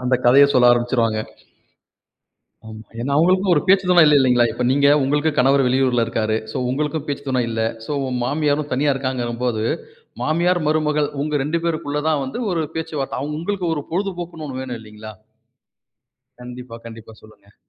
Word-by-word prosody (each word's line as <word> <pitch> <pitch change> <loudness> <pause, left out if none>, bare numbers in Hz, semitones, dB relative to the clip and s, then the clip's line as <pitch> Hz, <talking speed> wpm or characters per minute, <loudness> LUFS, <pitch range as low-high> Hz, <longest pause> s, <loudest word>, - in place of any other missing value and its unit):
அந்த 130 +1 +2
கதைய 135 +4 +7
சொல்ல 125 -2 +5
ஆரம்பிச்சிருவாங்க. 120 -2 0 1.5
ம், 110 0 -9 0.2
ஏன்னா, 130 +4 -3
அவங்களுக்கும் 185 +4 +3
ஒரு 150 - +2
பேச்சு 190 0 +4
துணை 175 -2 +7
இல்லை, 150 -1 +5
இல்லைங்களா, 125 -3 +3
இப்ப 120 +2 -3
நீங்க, 140 +1 +3 0.2
உங்களுக்கு 145 +3 +1
கணவர் 135 +1 +4
வெளியூர்ல 125 -2 +2
இருக்காரு. 110 -1 -1 0.2
சோ - - -5
உங்களுக்கும் 150 +2 -2
பேச்சு 145 0 -4
துணை 130 -2 +1
இல்ல. 115 0 -2 0.3
சோ - - -8
உங்க 130 -1 -3
மாமியாரும் 145 +1 -1
தனியா 140 +2 +2
இருக்காங்கங்கும் 125 -3 -3
போது, 110 -3 -1 0.6
மாமியார் 175 +3 +1
மருமகள் 150 -1 +1
உங்க 150 +1 -3
2 165 +3 -1
பேருக்குள்ள 150 -3 -2
தான் 150 -3 +1
வந்து 135 - -5
ஒரு 165 -2 0
பேச்சுவார்த்தை. 155 -5 -4 0.2
உங்களுக்கு 185 +2 -3
ஒரு 145 - -4
பொழுதுபோக்குன்னு 175 -4 -4
ஒண்ணு 130 -1 -5
வேணும், 125 -3 -6
இல்லைங்களா? 110 0 -11 1.3
கண்டிப்பா, 125 -1 -9
கண்டிப்பா. 115 -1 -11
சொல்லுங்க. 105 -2 -20
135 Hz, 160 wpm, -20 LUFS, 120-155 Hz, 1.5 s, கதைய